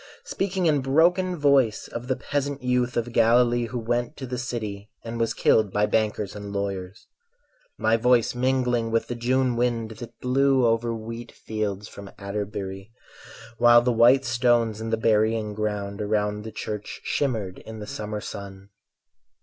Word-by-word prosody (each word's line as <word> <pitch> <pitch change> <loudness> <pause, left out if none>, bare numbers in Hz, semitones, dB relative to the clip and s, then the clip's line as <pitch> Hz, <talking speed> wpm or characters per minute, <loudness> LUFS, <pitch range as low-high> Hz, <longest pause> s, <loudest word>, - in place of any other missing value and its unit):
Speaking 190 -1 -1
in 150 -4 +3
broken 175 +7 +3
voice 140 -8 +2
of 120 +1 -7
the 130 - +1
peasant 140 +1 -3
youth 125 0 0
Of 120 +1 -1
Galilee 120 +1 +4
who 125 - -5
went 120 +1 -2
to 130 - -5
the 125 0 -4
city 110 -4 -5
And 115 0 -5
was 115 -1 0
killed 110 -3 +3
by 105 +1 +2
bankers 105 -2 -1
and 100 -1 -7
lawyers; 100 -2 -4 0.7
My 110 +1 +2
voice 120 0 +3
mingling 125 -2 +1
with 115 0 +1
the - - -1
June 125 +1 +1
wind 115 -2 0
That 115 +1 -10
blew 135 0 +3
over 115 0 +1
wheat 115 +1 -6
fields 105 -2 -4
from 100 -2 -10
Atterbury; 100 0 -5 0.7
While 120 0 +7
the 125 - +2
white 125 +4 +5
stones 120 -3 +2
in 115 - -4
the 115 - +1
burying 110 -1 +1
ground 105 -1 -3
Around 105 0 -1
the 110 - -6
Church 105 -1 -6
shimmered 110 -10 -2
in 110 0 -10
the 105 - -7
summer 105 0 -5
sun. 100 -1 -8
115 Hz, 160 wpm, -25 LUFS, 105-125 Hz, 0.7 s, While